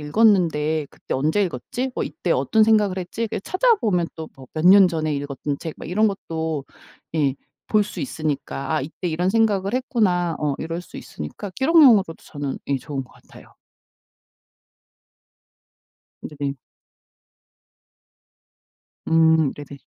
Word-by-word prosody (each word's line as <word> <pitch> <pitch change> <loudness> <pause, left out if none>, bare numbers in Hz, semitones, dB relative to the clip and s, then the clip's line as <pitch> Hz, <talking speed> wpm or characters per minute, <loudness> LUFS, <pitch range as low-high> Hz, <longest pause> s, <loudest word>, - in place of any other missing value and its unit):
읽었는데 160 -4 +2
그때 - - -6
언제 155 +9 +1
읽었지? 215 - -4
뭐 - - -1
이때 - - -2
어떤 220 -1 +3
생각을 210 -4 +3
했지?' 185 +5 -5
이렇게 225 - -2
찾아보면 240 - +2
또 160 -1 -7
뭐 130 -1 -12
몇 160 +2 0
년 195 0 +8
전에 155 -3 -1
읽었던 140 0 -4
책 160 -2 -5
막 - - -9
이런 215 +5 +3
것도 160 -6 -4 0.5
예 140 -4 +1 0.3
볼 215 -1 +3
수 205 - -7
있으니까 155 - -3
'아 - - +1
이때 170 +5 -5
이런 175 +4 0
생각을 205 -2 +1
했구나.' 195 - +1
어 145 -2 0
이럴 165 +2 -4
수 - - -11
있으니까 75 - -7
기록용으로도 265 - +5
저는 145 -2 -5
예 140 - +1
좋은 135 +1 -5
것 - - -18
같아요. - - -18 2.7
네네. 140 -2 -4 2.5
음 160 -2 +4
네네. 145 -1 -10
165 Hz, 270 characters per minute, -22 LUFS, 150-205 Hz, 2.7 s, 년